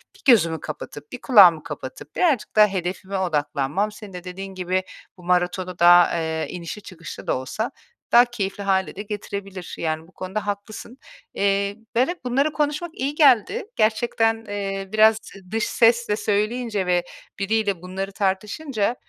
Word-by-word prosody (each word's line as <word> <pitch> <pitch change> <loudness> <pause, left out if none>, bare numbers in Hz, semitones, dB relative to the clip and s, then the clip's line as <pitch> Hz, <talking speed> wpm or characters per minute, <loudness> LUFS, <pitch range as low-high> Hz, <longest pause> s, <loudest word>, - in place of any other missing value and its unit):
1 - - -20
gözümü 165 -8 +3
kapatıp, 150 -1 -8
1 250 - -8
kulağımı 180 - +7
kapatıp 145 -1 -8
birazcık 275 -14 +1
daha 210 0 +7
hedefime 190 0 -4
odaklanmam 155 +2 -1
senin 210 -2 -11
de 180 -1 -7
dediğin 190 +1 -7
gibi, 185 +1 -1 0.3
bu 180 - -15
maratonu 180 0 0
da, 175 0 +7
eee, 160 -1 -2
inişli 175 +4 -6
çıkışlı 170 -5 -10
da - - +1
olsa 215 - -4 0.4
daha 240 +1 +8
keyifli 205 -4 -4
hâle 190 -1 0
de 200 - -5
getirebilir. 200 -3 -6
Yani 160 0 -3
bu - - -21
konuda 195 +3 -5
haklısın. 210 +4 -6 0.4
Eee, 200 0 0 0.2
ben 255 +3 +4
hep, 350 -4 -5
bunları 275 +5 +1
konuşmak 300 +3 -1
iyi 280 +3 -3
geldi. 295 - +4
Gerçekten, 225 0 +1
eee, 195 -1 -4
biraz 220 +1 +6
z 195 -2 -14
dış 225 0 0
sesle 230 -2 +3
söyleyince 210 0 -1
ve 180 -1 +2 0.4
biriyle 200 -3 0
bunları 190 +2 -5
tartışınca, 210 +5 -1
200 Hz, 155 wpm, -23 LUFS, 180-225 Hz, 0.4 s, daha